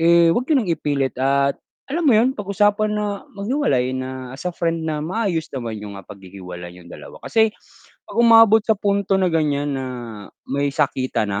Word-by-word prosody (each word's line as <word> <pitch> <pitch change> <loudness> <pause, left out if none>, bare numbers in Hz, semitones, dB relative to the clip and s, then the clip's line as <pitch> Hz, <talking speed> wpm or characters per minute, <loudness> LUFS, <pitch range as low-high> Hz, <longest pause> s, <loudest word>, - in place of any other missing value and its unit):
eh, 170 0 +5
'wag 250 +7 -1
niyo 310 - +4
nang 215 -9 0
ipilit 145 -4 -1
at 140 +1 +1 0.3
alam 335 +4 -1
mo - - +6
'yon, 235 +4 +4
pag-usapan 205 +1 +1
na 205 -1 -3
maghiwalay 200 - 0
na 130 -1 -6
as 135 - -9
a 180 - -5
friend 165 -1 -1
na 150 -1 -2
maayos 185 -2 -2
naman 120 -4 -4
yung, 105 -1 -8
ah, - - -20
paghihiwalay 90 -3 -10
niyong 90 -1 -15
dalawa, - - -11
kasi 220 -1 +3 0.6
'pag - - -9
umabot 225 -2 +7
sa 220 - +3
punto 200 -1 +1
na 185 - +2
ganiyan, 145 -2 0
na 135 -1 -3 0.6
may 140 +1 0
sakitan 130 -4 0
na, 100 0 -2
165 Hz, 185 wpm, -21 LUFS, 130-210 Hz, 0.6 s, umabot